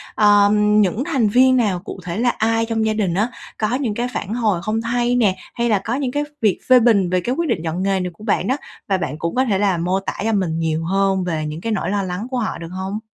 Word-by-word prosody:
ờm, 210 0 +4
những 205 +5 +1
thành 270 -10 +1
viên 255 +4 +5
nào, 205 -7 +1
cụ 190 - -8
thể 175 +1 -4
là 245 +2 +2
ai 225 0 +1
trong 225 -1 -1
gia 220 - +1
đình 205 -5 0
á, 210 +7 +1 0.3
có 215 +3 0
những 255 -5 -1
cái 240 +3 -2
phản 205 - -3
hồi 215 -7 0
không 215 +2 -1
hay 240 +1 0
nè, 210 -6 +3 0.2
hay 235 0 -1
là 210 -3 +3
có 225 +5 -3
những 265 -2 -2
cái 290 +3 -1
v - - -8
việc 210 -4 +2
phê 255 -1 +8
bình 215 -6 +3
về 180 0 +1
cái 245 +7 -2
quyết 335 0 -1
định 160 - 0
chọn 170 +3 -2
nghề 195 -1 +1
này 180 -1 -2
của 190 - -15
bạn 200 -3 0
đó? 260 - +1 0.3
Và 195 - +1
bạn 150 -6 -3
cũng 170 0 -3
có 260 +1 +2
thể 205 -6 +1
là 195 -3 +2
mô 180 +3 0
tả 195 - -4
cho 225 +1 0
mình 175 -5 0
nhiều 160 0 -1
hơn 195 +1 +1
về 160 -3 -2
những 150 +2 -5
cái 230 - -3
nỗi 190 -5 -1
lo 200 0 0
lắng 185 +4 -4
của 255 - -1
họ 230 -3 -2
được 165 0 -8
hông? 190 +3 -4
210 Hz, 285 wpm, -20 LUFS, 185-235 Hz, 0.3 s, phê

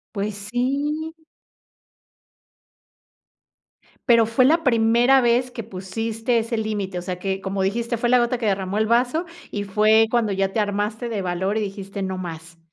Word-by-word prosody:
¡Pues 205 +1 -2 0.2
sí! 290 +6 -1 3.0
Pero 230 -2 +6
fue 230 +3 +3
la 325 +4 +3
primera 240 +1 +4
vez 245 +1 +2
que 235 -2 -6
pusiste 225 +4 -2
ese 230 +1 -3
límite, 205 -4 -3
o - - -3
sea 180 0 -5
que, 190 +1 -3
como 195 0 -3
dijiste: 230 +5 -1
"Fue 240 - 0
la 250 +1 +5
gota 240 +1 +1
que 235 - -4
derramó 195 -1 -1
el 220 0 +1
vaso". 250 +9 +1 0.3
Y 205 -1 -3
fue 215 +3 +4
cuando 230 -3 +1
ya 195 0 -1
te 220 - +1
armaste 210 +3 -2
de 215 -3 -2
valor 190 +3 -1
y - - 0
dijiste: 195 0 -5
"No 190 0 -3
más". 165 -2 -8
220 Hz, 165 wpm, -22 LUFS, 195-240 Hz, 3.0 s, Pero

